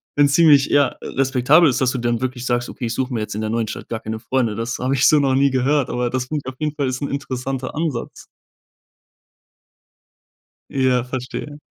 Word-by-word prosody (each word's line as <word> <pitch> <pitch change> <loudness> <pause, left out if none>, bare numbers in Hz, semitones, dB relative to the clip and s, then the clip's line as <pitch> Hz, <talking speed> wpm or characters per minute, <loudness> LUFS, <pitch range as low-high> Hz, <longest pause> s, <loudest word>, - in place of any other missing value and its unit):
wenn's 145 -1 +4
ziemlich, 145 -4 +6
ja, 145 -1 +2
respektabel 135 +5 +3
ist, 130 - 0
dass 130 -1 +2
du 130 - -3
dann 120 -1 0
wirklich 130 -1 -3
sagst: 120 -1 -1
„Okay, 120 - -6
ich 115 - -2
suche 130 +1 -2
mir 115 - -1
jetzt 105 -1 -5
in 110 - -3
der 110 - -2
neuen 115 0 -1
Stadt 110 - -7
gar 115 - -3
keine 110 0 -5
Freunde.“ 115 -2 -1
Das 115 +2 -3
habe 130 +2 0
ich 135 - +4
so 155 - +5
noch 135 -2 +2
nie 140 +1 +4
gehört, 130 +2 +1
aber 125 0 -1
das 130 0 -2
klingt 150 -2 -3
auf 130 - -5
jeden 150 -1 -1
Fall 140 -3 -1
ist 130 +1 -3
'n 140 - -2
interessanter 135 -1 -4
Ansatz. 155 -6 -4 2.5
Ja, 130 -2 +1
verstehe. 130 +3 -6
130 Hz, 210 wpm, -20 LUFS, 120-140 Hz, 2.5 s, ziemlich